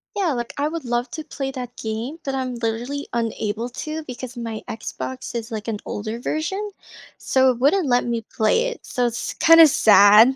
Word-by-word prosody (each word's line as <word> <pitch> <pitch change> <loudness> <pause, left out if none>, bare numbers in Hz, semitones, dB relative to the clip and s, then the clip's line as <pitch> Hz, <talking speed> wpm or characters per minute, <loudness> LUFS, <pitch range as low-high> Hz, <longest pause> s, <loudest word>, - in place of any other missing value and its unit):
Yeah, 375 -7 +1
like, 240 -2 -4
I 290 +1 +1
would 320 -2 -5
love 240 +1 -1
to 315 +5 -5
play 270 -3 -4
that 250 -2 -7
game, 225 +7 -4
but 270 -1 -2
I'm 260 -1 -2
literally 240 +5 -3
unable 225 -1 -2
to 310 +5 -5
because 255 -2 -8
my 230 -2 -5
Xbox 255 +4 -6
is, 230 0 -4
like, 215 0 -5
an 220 -2 -2
older 215 +2 -4
version, 380 +10 -2 0.5
so 260 0 +3
it 250 - +1
wouldn't 300 +5 +3
let 245 0 +3
me 235 -1 -1
play 345 - +2
it, 485 -1 -7
so 245 -1 0
it's, 235 0 -4
kinda, 330 -1 +8
sad. 215 0 +7
245 Hz, 190 wpm, -22 LUFS, 230-285 Hz, 0.5 s, kinda